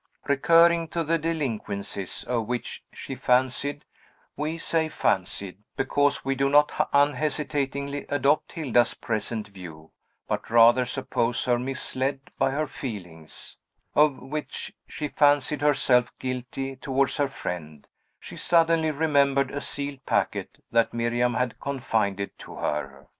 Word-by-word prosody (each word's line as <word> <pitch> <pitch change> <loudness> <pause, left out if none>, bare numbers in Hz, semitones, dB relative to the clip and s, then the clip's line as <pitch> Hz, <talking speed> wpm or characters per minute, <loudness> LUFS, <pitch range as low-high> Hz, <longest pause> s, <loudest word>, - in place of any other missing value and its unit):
Recurring 165 +4 +5
to 165 +1 -2
the 165 +1 +1
delinquencies 115 - -3
of 115 -3 -1
which 125 0 -4
she - - -7
fancied 130 +3 +1 0.5
(we 155 +2 -2
say 165 -1 0
"fancied," 95 - -1 0.2
because 145 +1 +1
we 135 - +1
do 135 +1 +1
not 145 +1 +3
unhesitatingly 145 -1 0
adopt 145 +1 +1
Hilda's 120 -7 +2
present 110 -1 -3
view, 85 -5 -11 0.4
but - - -3
rather 120 +2 +6
suppose 125 -3 -1
her 120 -1 +2
misled 135 +1 -2 0.2
by - - +3
her 145 +3 -1
feelings) 90 - -8 0.4
of 150 -2 +4
which 150 +3 -6
she 150 - -4
fancied 145 0 +2
herself 130 -4 +3
guilty 130 +1 -4
towards 135 0 0
her 145 -1 +2
friend, 80 - -6 0.3
she - - -10
suddenly 165 -2 +3
remembered 140 -3 +2
a 145 - -4
sealed 140 -1 -4
packet - - -1
that 115 0 +2
Miriam 120 +1 +1
had 125 -1 -1
confided 110 -8 -1
to - - -10
her. 70 -2 -3
135 Hz, 125 wpm, -26 LUFS, 120-145 Hz, 0.5 s, rather